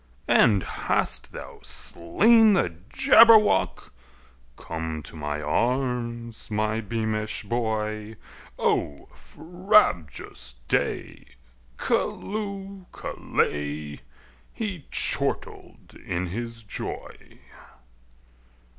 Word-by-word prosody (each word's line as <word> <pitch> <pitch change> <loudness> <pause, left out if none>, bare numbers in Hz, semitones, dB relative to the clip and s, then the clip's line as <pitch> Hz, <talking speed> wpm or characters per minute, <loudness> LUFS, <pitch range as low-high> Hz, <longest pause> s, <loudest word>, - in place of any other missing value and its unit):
"And 100 -4 +4
hast - - -1
thou - - -10
slain 220 - +3
the 90 - +1 0.2
Jabberwock? 225 - +5 0.6
Come 80 0 -5
to - - -11
my 75 -1 -4
arms, 120 - -2
my 110 +1 0
beamish 110 0 -2
boy! 110 -1 -2 0.4
O 70 -1 -1
frabjous 160 - 0
day! - - -2 0.5
Callooh! 200 -2 -3
Callay!" 75 0 -3 0.5
He 200 -9 -5
chortled - - -1
in 90 +1 -2
his 115 +5 -6
joy. 100 - -7
110 Hz, 75 wpm, -25 LUFS, -, 0.6 s, Jabberwock